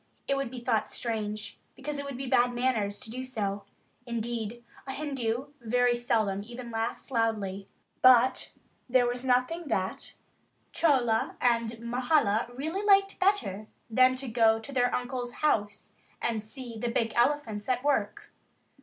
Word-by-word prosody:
It 275 Hz, -, +2 dB
would 275 Hz, -3 st, -2 dB
be 250 Hz, 0 st, -7 dB
thought 235 Hz, -3 st, 0 dB
strange 215 Hz, -3 st, -4 dB, 0.2 s
because 290 Hz, +2 st, -5 dB
it 280 Hz, -, -4 dB
would 280 Hz, -3 st, -5 dB
be 270 Hz, -, -4 dB
bad 245 Hz, -1 st, +3 dB
manners 225 Hz, -5 st, 0 dB
to 220 Hz, -, -7 dB
do 255 Hz, +2 st, -4 dB
so; 205 Hz, -6 st, -3 dB, 0.4 s
indeed 235 Hz, 0 st, -3 dB, 0.2 s
a 265 Hz, -, -3 dB
Hindu 265 Hz, -3 st, -2 dB
very 245 Hz, +1 st, +2 dB
seldom 220 Hz, -5 st, 0 dB
even 240 Hz, +2 st, -8 dB
laughs 225 Hz, +3 st, -3 dB
loudly. 210 Hz, -5 st, -1 dB, 0.3 s
But 255 Hz, 0 st, +5 dB, 0.4 s
there 250 Hz, 0 st, +4 dB
was 245 Hz, +1 st, -2 dB
nothing 260 Hz, +6 st, +1 dB
that 190 Hz, -7 st, -2 dB, 0.6 s
Chola 250 Hz, -8 st, +2 dB
and 235 Hz, -2 st, +1 dB
Mahala 240 Hz, -2 st, +2 dB
really 320 Hz, +8 st, -2 dB
liked 395 Hz, -1 st, +4 dB
better 370 Hz, -, +1 dB, 0.2 s
than 255 Hz, +2 st, +5 dB
to 265 Hz, +1 st, -6 dB
go 225 Hz, -1 st, +4 dB
to 225 Hz, +5 st, -9 dB
their 245 Hz, -2 st, +2 dB
uncle's 245 Hz, -1 st, -3 dB
house 205 Hz, -7 st, 0 dB, 0.3 s
and 225 Hz, -3 st, -1 dB
see 235 Hz, 0 st, -8 dB
the 240 Hz, -, -1 dB
big 230 Hz, -1 st, 0 dB
elephants 240 Hz, -4 st, +1 dB
at 250 Hz, 0 st, +1 dB
work. 245 Hz, -8 st, 0 dB
240 Hz, 150 wpm, -29 LUFS, 225-260 Hz, 0.6 s, But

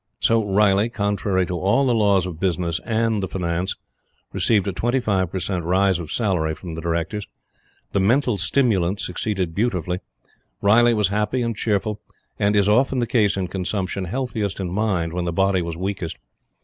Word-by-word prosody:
So 115 Hz, -1 st, +3 dB
Riley, 100 Hz, +1 st, +3 dB
contrary 100 Hz, -3 st, 0 dB
to 90 Hz, -1 st, -3 dB
all 100 Hz, +9 st, +2 dB
the 125 Hz, -, +2 dB
laws 100 Hz, -5 st, +3 dB
of 85 Hz, -4 st, -6 dB
business 85 Hz, -2 st, 0 dB
and 115 Hz, -2 st, +1 dB
the 95 Hz, -, -2 dB
finance, 90 Hz, 0 st, -2 dB, 0.6 s
received 105 Hz, -3 st, +2 dB
a -, -, +1 dB
25 110 Hz, -6 st, 0 dB
per -, -, -3 dB
cent, 90 Hz, -1 st, -2 dB
rise 95 Hz, +1 st, +2 dB
of 80 Hz, -3 st, -7 dB
salary 90 Hz, -9 st, 0 dB
from 85 Hz, -1 st, -8 dB
the 80 Hz, -, -5 dB
Directors. 85 Hz, +5 st, -2 dB, 0.6 s
The -, -, +1 dB
"mental 120 Hz, +2 st, +2 dB
stimulant" 100 Hz, -3 st, +1 dB
succeeded 90 Hz, -2 st, -2 dB
beautifully. 90 Hz, -4 st, -1 dB, 0.6 s
Riley 120 Hz, +3 st, +5 dB
was 105 Hz, -3 st, +2 dB
happy 105 Hz, +5 st, 0 dB
and 115 Hz, -1 st, -2 dB
cheerful, 105 Hz, 0 st, -1 dB, 0.4 s
and, 100 Hz, +1 st, +2 dB
as 100 Hz, -1 st, +4 dB
is -, -, +2 dB
often 130 Hz, +5 st, +3 dB
the 120 Hz, -, +1 dB
case 105 Hz, -5 st, +2 dB
in 95 Hz, -2 st, -1 dB
consumption, 95 Hz, +1 st, -2 dB
healthiest 110 Hz, -2 st, -3 dB
in 90 Hz, -2 st, -3 dB
mind 95 Hz, -5 st, 0 dB
when 90 Hz, 0 st, -2 dB
the 85 Hz, -, -1 dB
body 95 Hz, +1 st, +2 dB
was 85 Hz, -1 st, -4 dB
weakest. 95 Hz, -2 st, -4 dB
100 Hz, 175 wpm, -22 LUFS, 90-110 Hz, 0.6 s, Riley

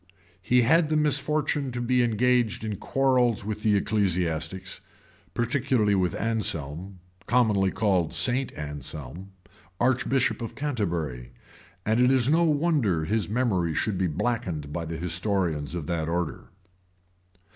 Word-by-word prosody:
He 125 Hz, +5 st, +3 dB
had 160 Hz, +5 st, +4 dB
the 155 Hz, -, +2 dB
misfortune 150 Hz, -1 st, 0 dB
to 120 Hz, -, -3 dB
be 125 Hz, +1 st, +2 dB
engaged 120 Hz, 0 st, +1 dB
in 105 Hz, -2 st, -3 dB
quarrels 125 Hz, -5 st, +1 dB
with 105 Hz, 0 st, -4 dB
the 110 Hz, -2 st, +3 dB
ecclesiastics, 90 Hz, -3 st, -1 dB, 0.5 s
particularly 120 Hz, -3 st, +1 dB
with 90 Hz, -3 st, +1 dB
Anselm, 95 Hz, -5 st, -2 dB, 0.3 s
commonly 105 Hz, -6 st, +3 dB
called 95 Hz, -6 st, +1 dB
St. 120 Hz, +11 st, +1 dB
Anselm, 75 Hz, +5 st, -7 dB, 0.5 s
archbishop 130 Hz, +1 st, +1 dB
of 115 Hz, -, -5 dB
Canterbury; 85 Hz, -, -3 dB, 0.5 s
and 110 Hz, +2 st, +2 dB
it 125 Hz, -, +5 dB
is 130 Hz, -1 st, +3 dB
no 165 Hz, +2 st, +4 dB
wonder 145 Hz, -, +1 dB
his 105 Hz, +4 st, -1 dB
memory 100 Hz, -9 st, 0 dB
should 100 Hz, -4 st, -1 dB
be 95 Hz, -, +2 dB
blackened 85 Hz, -5 st, -2 dB
by 85 Hz, +1 st, -3 dB
the 80 Hz, 0 st, -5 dB
historians 85 Hz, -3 st, -1 dB
of 85 Hz, -4 st, -4 dB
that 80 Hz, -1 st, -2 dB
order. 85 Hz, -2 st, -2 dB
105 Hz, 130 wpm, -26 LUFS, 85-125 Hz, 0.5 s, it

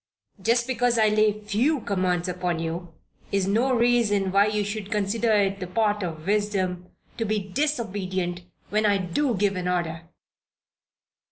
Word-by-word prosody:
Just 235 Hz, +4 st, +2 dB
because 245 Hz, -1 st, +1 dB
I 215 Hz, -1 st, +4 dB
lay 215 Hz, 0 st, +4 dB
few 235 Hz, +8 st, +1 dB
commands 185 Hz, -3 st, 0 dB
upon 180 Hz, -1 st, -2 dB
you, 165 Hz, +1 st, -4 dB, 0.4 s
is 195 Hz, -1 st, +1 dB
no 225 Hz, +7 st, +2 dB
reason 230 Hz, -5 st, +2 dB
why 200 Hz, +2 st, +4 dB
you 210 Hz, 0 st, 0 dB
should 205 Hz, 0 st, -5 dB
consider 220 Hz, +2 st, 0 dB
it 200 Hz, -2 st, +2 dB
the 180 Hz, -, -5 dB
part 210 Hz, +2 st, +1 dB
of 160 Hz, -4 st, -5 dB
wisdom 190 Hz, -3 st, -1 dB, 0.3 s
to 230 Hz, -, -1 dB
be 215 Hz, 0 st, 0 dB
disobedient 195 Hz, -6 st, -2 dB, 0.3 s
when 215 Hz, +1 st, +1 dB
I 200 Hz, -1 st, +3 dB
do 205 Hz, +8 st, 0 dB
give 200 Hz, 0 st, +1 dB
an 180 Hz, -1 st, -3 dB
order." 165 Hz, -2 st, -2 dB
205 Hz, 155 wpm, -25 LUFS, 180-220 Hz, 0.4 s, I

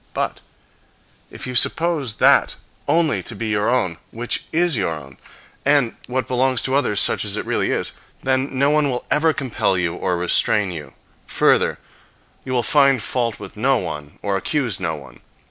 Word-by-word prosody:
But -, -, -2 dB, 0.9 s
if -, -, -8 dB
you 125 Hz, -, -5 dB
suppose 150 Hz, -3 st, +1 dB
that -, -, +4 dB, 0.3 s
only 160 Hz, +1 st, +2 dB
to 115 Hz, -, -8 dB
be 110 Hz, +1 st, -3 dB
your 105 Hz, -1 st, +1 dB
own 95 Hz, -10 st, 0 dB
which 120 Hz, +2 st, -2 dB
is 170 Hz, -1 st, +2 dB
your 95 Hz, -7 st, -1 dB
own, 70 Hz, -3 st, -12 dB, 0.5 s
and 140 Hz, -4 st, +3 dB
what 130 Hz, +1 st, -2 dB
belongs 130 Hz, 0 st, +1 dB
to 130 Hz, -, -1 dB
others 135 Hz, -7 st, +2 dB
such -, -, +3 dB
as -, -, -2 dB
it -, -, -3 dB
really -, -, 0 dB
is, -, -, -1 dB, 0.3 s
then 130 Hz, 0 st, 0 dB
no 140 Hz, +2 st, +3 dB
one 150 Hz, -1 st, +2 dB
will 125 Hz, -2 st, -3 dB
ever 160 Hz, +2 st, +4 dB
compel 125 Hz, -9 st, -1 dB
you 90 Hz, -2 st, 0 dB
or 90 Hz, -2 st, -1 dB
restrain 95 Hz, +3 st, +2 dB
you. 80 Hz, -5 st, -8 dB, 0.3 s
Further, -, -, +2 dB, 0.7 s
you 130 Hz, -, -6 dB
will 125 Hz, -2 st, +1 dB
find 140 Hz, -2 st, +4 dB
fault 115 Hz, 0 st, -2 dB
with -, -, -10 dB
no 130 Hz, +5 st, +2 dB
one 75 Hz, -8 st, -6 dB
or 100 Hz, -1 st, 0 dB
accuse 130 Hz, -, -1 dB
no 80 Hz, -4 st, -2 dB
one. 65 Hz, -4 st, -13 dB
125 Hz, 180 wpm, -21 LUFS, 95-140 Hz, 0.9 s, that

